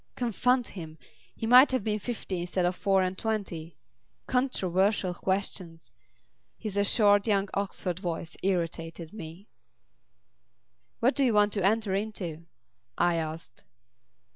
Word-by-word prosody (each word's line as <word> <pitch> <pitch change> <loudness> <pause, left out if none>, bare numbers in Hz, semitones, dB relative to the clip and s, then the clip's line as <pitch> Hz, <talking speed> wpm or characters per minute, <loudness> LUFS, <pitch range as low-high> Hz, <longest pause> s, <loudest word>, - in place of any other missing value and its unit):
Confound 250 +1 +1
him! 160 -4 -9 0.4
He - - -4
might 250 +5 +8
have 255 -5 0
been 215 0 -1
fifty 200 -5 -4
instead 180 +1 -1
of 175 +1 +1
four 195 0 +2
and 185 0 -1
twenty. 190 -7 -4 0.5
Controversial 195 -6 +1
questions! 185 -3 -3 0.7
His 215 -3 -5
assured 205 0 +4
young 200 -2 +2
Oxford 185 -3 -2
voice 170 -2 -4
irritated 170 -2 -2
me. 180 0 -9 1.5
"What 255 +4 +4
do 280 - +1
you 240 -5 +3
want 205 0 +4
to 200 - 0
enter 210 0 +2
into?" 185 -6 -4 0.5
I 175 0 +3
asked. 160 -5 -6
195 Hz, 125 wpm, -28 LUFS, 175-215 Hz, 1.5 s, might